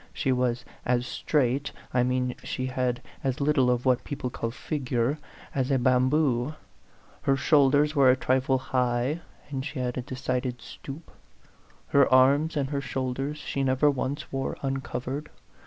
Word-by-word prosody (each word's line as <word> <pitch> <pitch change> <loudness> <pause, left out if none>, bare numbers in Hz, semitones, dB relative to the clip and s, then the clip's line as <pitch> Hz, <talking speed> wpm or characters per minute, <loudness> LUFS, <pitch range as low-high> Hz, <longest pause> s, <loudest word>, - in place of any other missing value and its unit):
She 135 - 0
was 125 -1 0 0.2
as 125 0 +1
straight 135 +2 0 0.2
I 125 - +3
mean 125 0 +1
she 130 - -3
had 125 -1 -1 0.2
as 135 0 -1
little 140 -3 +3
of 125 0 +1
what 125 -1 +3
people 140 -4 -4
call 115 - -3
figure 130 +1 -1 0.3
as 130 -1 0
a 135 - +3
bamboo; 130 +2 +2 0.7
her 135 0 +2
shoulders 145 +1 +4
were 135 -2 +6
a 130 - +6
trifle 130 +1 +1
high, 125 +4 0 0.3
and 135 -2 -2
she 150 0 -6
had 125 0 -2
a - - -1
decided 125 -1 -3
stoop; 145 +7 -10 0.8
her 140 -2 +4
arms 140 +5 +5
and 140 -1 -1
her 140 -1 -1
shoulders 135 +2 -3
she 140 -2 -3
never 135 +3 +3
once 140 +2 -3
wore 135 0 -2
uncovered. 135 +1 -3
130 Hz, 155 wpm, -27 LUFS, 125-140 Hz, 0.8 s, were